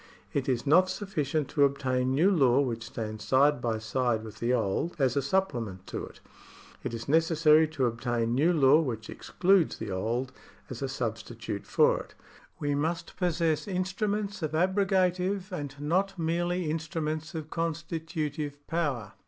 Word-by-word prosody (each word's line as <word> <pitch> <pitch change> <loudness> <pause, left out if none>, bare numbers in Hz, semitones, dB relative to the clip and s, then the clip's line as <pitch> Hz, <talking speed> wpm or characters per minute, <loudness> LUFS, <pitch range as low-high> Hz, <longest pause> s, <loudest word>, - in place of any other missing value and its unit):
It 140 -1 -1
is 120 -2 0
not 180 +6 +5
sufficient 155 -7 -2
to 145 - +2
obtain 130 -2 +1
new 175 +8 +4
law 135 -8 +4
which 115 -5 -1
stands 110 -1 -5
side 140 +1 +3
by 115 -2 0
side 110 +1 -1
Avith 110 -2 -10
the 120 +1 0
old, 120 - 0
as 130 -5 +2
a 140 - +2
supplement 125 - -1
to - - -5
it; - - -15 0.6
it - - -3
is 115 - -7
necessary 160 0 +4
to 155 -4 -1
obtain 115 0 -1
new 150 +8 +3
law 150 -2 +5
which 115 -7 -4
excludes 185 -2 +2
the 100 - -5
old, 115 +7 -2 0.4
as 125 - -6
a 135 - -2
substitute 110 -4 -4
for - - +3
it. - - -11 0.4
We 145 0 0
must 165 +4 -2
possess 170 -2 0
instruments 200 +2 -2
of 155 -1 -2
abrogative, 185 +1 +1
and 145 -6 -5
not 185 +6 0
merely 175 +2 0
instru 160 +1 -2
ments 155 +1 -3
of 155 -1 -6
constitutive 160 -3 -3
power. 140 - -2
150 Hz, 160 wpm, -29 LUFS, 125-170 Hz, 0.6 s, not